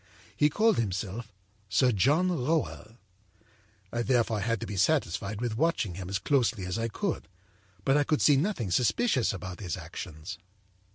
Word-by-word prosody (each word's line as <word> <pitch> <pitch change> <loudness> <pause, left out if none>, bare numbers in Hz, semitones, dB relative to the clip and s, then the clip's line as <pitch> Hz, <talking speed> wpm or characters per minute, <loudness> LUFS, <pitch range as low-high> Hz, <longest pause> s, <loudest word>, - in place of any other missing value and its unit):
He 150 - +4
called 215 +7 +3
himself 105 +1 -3 0.4
Sir 125 +8 +4
John 145 - +3
Rowell. 140 -7 -1 1.0
âI 120 0 0
therefore 115 -3 +2
had 115 +2 0
to - - -3
be 105 - -5
satisfied 100 - +1
with 115 -2 -2
watching 155 - +1
him 90 +1 -6
as 100 - 0
closely 120 -2 +1
as 90 +4 -2
I 115 - 0
could, 110 - -3 0.6
but 135 - +4
I 145 - +4
could 150 +1 +1
see 145 - +6
nothing 135 - 0
suspicious 130 - +2
about 90 -1 -6
his 90 -6 -3
actions. 85 +2 -7
115 Hz, 160 wpm, -29 LUFS, 95-140 Hz, 1.0 s, see